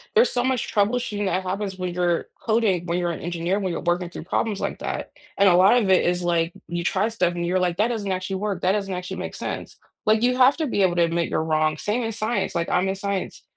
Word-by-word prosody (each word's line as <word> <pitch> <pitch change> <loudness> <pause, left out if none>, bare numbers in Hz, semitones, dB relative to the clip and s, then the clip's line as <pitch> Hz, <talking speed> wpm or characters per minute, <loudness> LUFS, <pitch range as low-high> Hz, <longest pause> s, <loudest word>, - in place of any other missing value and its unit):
there's 470 +3 +5
so 245 -1 0
much 260 -2 -1
troubleshooting 210 0 0
that 185 0 0
happens 190 +1 -3
when 180 -1 -3
you're 175 -1 0 0.2
coding, 220 -6 +1
when 170 - 0
you're 175 -1 0
an - - -5
engineer, 175 +3 -1
when 190 -3 -2
you're - - -3
working 175 0 0
through - - -8
problems 215 -3 -1
like - - -3
that, - - -4 0.3
and 200 - +5
a 175 - +6
lot 195 +7 +6
of 205 -5 +1
it 185 - +5
is, 175 0 +1
like, 170 -1 +1
you 170 +1 -3
try 190 +3 +1
stuff 180 -6 0
and 170 0 -2
you're 185 +2 +1
like, 175 -1 0
"That 220 +3 +2
doesn't 205 -5 -2
actually 185 +1 -2
work, 200 -2 -3
that 185 - +3
doesn't 195 -2 -1
actually 180 0 -5
make - - -5
sense." - - -5 0.3
Like, 220 +2 +4
you 250 +1 +2
have 260 +2 +5
to 320 - 0
be 205 -6 0
able 180 -2 +3
to 170 - +4
admit 170 0 0
you're 160 - 0
wrong, 155 -1 +1
same 215 +8 -1
in 225 - -2
science, 225 -2 -2
like, 170 0 -1
I'm 180 +2 +2
in 190 - -1
science. 200 -1 -4
190 Hz, 260 wpm, -24 LUFS, 175-210 Hz, 0.3 s, a